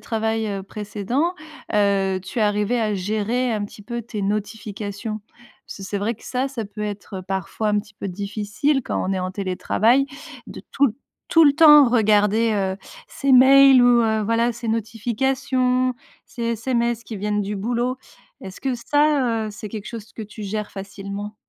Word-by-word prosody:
travails, 220 0 -1
heu, 195 -1 -4
précédents, 215 - -2 0.4
heu, 195 -2 +2
tu 195 +6 -6
es - - +3
arrivée 210 +3 +1
à 215 -2 0
gérer 215 +6 -1
un 210 -2 -1
petit 205 +1 -11
peu 235 +2 -5
tes 220 -2 -6
notifications? 210 +1 -4 0.5
Parce - - -9
que - - -9
c'est 200 +1 -3
vrai 215 +4 -1
que 220 - -19
ça 260 +2 -1
ça 250 -5 -5
peut 210 +1 -8
être, 205 -2 -5
parfois, 195 +3 -2
un 210 0 +2
petit 210 +1 -8
peu 200 - -5
difficile 210 +8 -1
quand - - -2
on - - 0
est 190 - -1
en 185 0 -3
télétravail, 210 +7 +1 0.4
de - - -9
tout 275 -5 +2 0.3
tout 330 -1 +6
le 285 - +6
temps 295 -3 +8
regarder, 215 -1 +3
heu, 190 -2 -1 0.3
ses 275 - -2
mails 265 +1 +8
ou, 245 -1 +5
heu, 220 -1 +1
voilà 230 +2 +2
ses 235 0 -8
notifications, 250 +3 0 0.3
ses 240 - -8
SMS 235 0 -1
qui 220 - -7
viennent 210 +1 -1
du 205 +1 -3
boulot. 240 +5 -1 0.4
Est-ce 190 -1 -10
que 265 -2 -1
ça, 260 -3 +1
heu, - - -4
c'est 215 0 -8
quelque 210 -1 -7
chose 225 -1 -8
que 225 - -7
tu 215 +1 -10
gères 210 +1 -4
facilement? 200 +1 -7
220 Hz, 180 wpm, -22 LUFS, 205-245 Hz, 0.5 s, temps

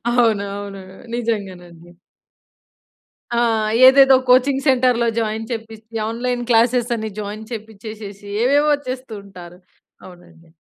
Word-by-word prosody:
అవును. 230 -4 +2
అవును. 200 -1 -7 0.3
నిజంగానండి. 185 -7 -5 1.5
ఆ! - - +1 0.5
ఏదేదో 270 0 +7
కోచింగ్ 265 +2 +3
సెంటర్‌లో 250 -3 +3
జాయిన్ 220 0 -3
చేపిచ్చి, 225 -1 -8
ఆన్‌‌లైన్ 245 +2 -3
క్లాసెస్ 240 +1 +2
అని 220 -1 -5
జాయిన్ 210 +1 -6
చేపిచ్చేసేసి, 215 -2 -9 0.2
ఏవేవో 290 +3 +3
చేస్తూ 255 -2 -6
ఉంటారు. 180 -3 -13 0.5
అవునండి. 175 -2 -16
225 Hz, 100 wpm, -19 LUFS, 200-245 Hz, 1.5 s, ఏదేదో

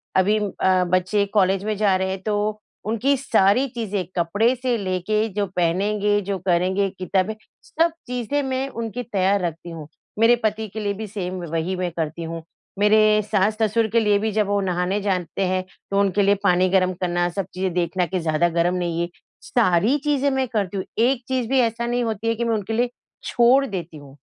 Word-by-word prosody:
अभी 195 +3 +3
अ, 190 -2 +1
बच्चे 185 +3 +2
कॉलेज 195 -2 +2
में 215 0 -1
जा 200 -2 +3
रहे 190 0 -1
हैं 190 0 -4
तो 210 0 -1 0.2
उनकी 230 +6 +1
सारी 240 0 +3
चीज़ें 205 -5 -2
कपड़े 205 +8 +2
से 250 -1 -1
लेके 200 +2 -1
जो 205 +1 0
पहनेंगे, 205 +4 +1
जो 200 0 -3
करेंगे 185 +2 +1
किताबें 185 +2 0 0.3
सब 330 +1 +1 0.2
चीज़ें 250 +3 -1
मैं 265 0 -2
उनकी 230 -1 -5
तैयार 200 -3 +1
रखती 170 0 -4
हूँ। 160 -3 -8 0.3
मेरे 230 +2 +6
पति 215 0 -1
के 215 +2 -7
लिए 205 -1 -1
भी 215 +2 -6
सेम 185 -3 -5
वही 165 +3 -1
मैं 180 -1 -2
करती 165 0 -4
हूँ। 165 0 -5 0.4
मेरे 215 +1 +5
सास-ससुर 215 +2 +2
के 230 - +5
लिए 210 -2 +3
भी 220 +1 -1
जब 210 -1 +1
वो 205 0 +1
नहाने 180 +1 0
जाते 190 -1 -1
हैं 185 0 0 0.3
तो 200 - +2
उनके 200 0 +2
लिए 200 0 +4
पानी 185 -1 +3
गर्म 185 -1 +2
करना 175 -1 +1
सब 195 +2 -3
चीज़ें 185 0 -2
देखना 180 +1 0
कि 185 +1 -2
ज़्यादा 165 +1 +1
गर्म 170 +2 +1
नहीं 170 -2 -1
है 170 - -1 0.4
सारी 220 +3 +2
चीज़ें 285 -2 +1
मैं 265 -1 0
करती 205 -4 -2
हूँ। 190 - -3 0.2
एक 250 0 +1
चीज़ 255 -3 -1
भी 265 0 +3
ऐसा 235 -1 0
नहीं 240 0 0
होती 225 -1 -3
है 230 - +2
कि 235 - -2
मैं 230 - +1
उनके 210 +1 -3
लिए 240 +2 +1 0.3
छोड़ 250 +3 +4
देती 175 - -6
हूँ 140 -2 -14
200 Hz, 200 wpm, -22 LUFS, 185-225 Hz, 0.4 s, मेरे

